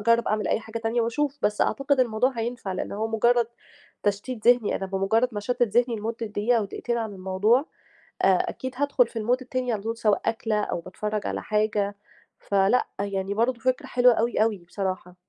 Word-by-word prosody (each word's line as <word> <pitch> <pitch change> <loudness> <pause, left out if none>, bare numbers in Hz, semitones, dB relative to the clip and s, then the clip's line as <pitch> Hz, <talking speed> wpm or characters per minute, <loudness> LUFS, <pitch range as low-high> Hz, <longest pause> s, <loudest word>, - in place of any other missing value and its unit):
أجرَّب 230 +2 +3
أعمل 215 0 0
أي - - +1
حاجة 220 +1 -6
تانية 225 +1 0
وأشوف، 280 +5 -1
بس 210 0 +1
أعتقد 275 +2 +2
الموضوع 240 +1 +2
هينفع 230 -3 -3
لإن 185 - -4
هو 215 +2 -1
مُجرّد 235 +1 +3 0.6
تشتيت 210 +3 -2
ذِهني، 245 -4 +4
أنا 195 - -4
بمُجرّد 195 +5 +1
ما 210 - -3
أشتِّت 245 +4 -1
ذِهني 240 +1 +2
لمُدّة 225 +2 -4
دقيقة 215 +3 +1
أو 215 - 0
دقيقتين 235 +4 -3
عن 220 -2 -3
الموضوع، 190 +5 +2 0.6
آآ - - +6 0.2
أكيد 260 0 -5
هادخُل 280 -3 +3
في 225 - -6
الMood 240 +4 +2
التاني 255 -1 -2
على 210 - -2
طول 225 +2 -3
سواء 210 -3 +2
أكلة 225 -2 0
أو - - -2
باتفرَّج 210 +4 -4
على - - -3
حاجة 210 -1 0 0.5
فلأ، 200 +4 +2
يعني 195 -1 -2
برضه 235 +3 +1
فكرة 255 +2 0
حلوة 245 0 +5
أوي، 230 -1 +1
أوي 220 -2 0
بصراحة. 185 -1 -4
225 Hz, 190 wpm, -25 LUFS, 205-245 Hz, 0.6 s, آآ